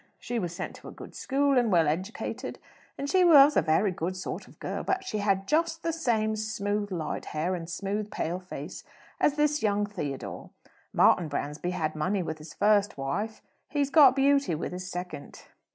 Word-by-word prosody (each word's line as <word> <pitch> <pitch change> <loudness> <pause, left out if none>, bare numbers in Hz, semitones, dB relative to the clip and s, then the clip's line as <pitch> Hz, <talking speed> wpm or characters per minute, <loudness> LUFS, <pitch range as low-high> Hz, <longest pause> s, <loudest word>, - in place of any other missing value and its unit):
She 240 -1 -3
was 175 -5 -3
sent - - -5
to - - -13
a - - -7
good - - -11
school 275 -1 +2
and 235 -3 +1
well 165 -4 +4
educated, 220 - -3 0.4
and 280 - -3
she 370 +4 +4
was 295 -4 +8
a - - +5
very 180 +6 +2
good 180 +1 -3
sort 185 - -5
of - - -19
girl; - - -3
but 380 0 -1
she 215 - -3
had 195 -1 +1
just 330 +1 +1
the 330 - 0
same 220 -9 0
smooth, 210 -1 -2
light 170 -4 -3
hair, 160 +5 -2
and 170 -2 -5
smooth, 200 +4 -3
pale 175 -2 -3
face 185 0 -8 0.4
as 295 - +3
this 300 0 +2
young 205 -1 +1
Theodore. 150 -10 -6 0.4
Martin 175 - +4
Bransby 150 +3 -3
had 155 -4 -2
money 185 +5 0
with 160 -1 -5
his 155 +1 -11
first 205 -2 +3
wife 195 +12 -3 0.3
he's 285 -1 0
got 275 -5 +7
beauty 275 - +3
with 155 - -4
his 180 0 -6
second." 180 -5 -7
205 Hz, 190 wpm, -28 LUFS, 175-270 Hz, 0.4 s, was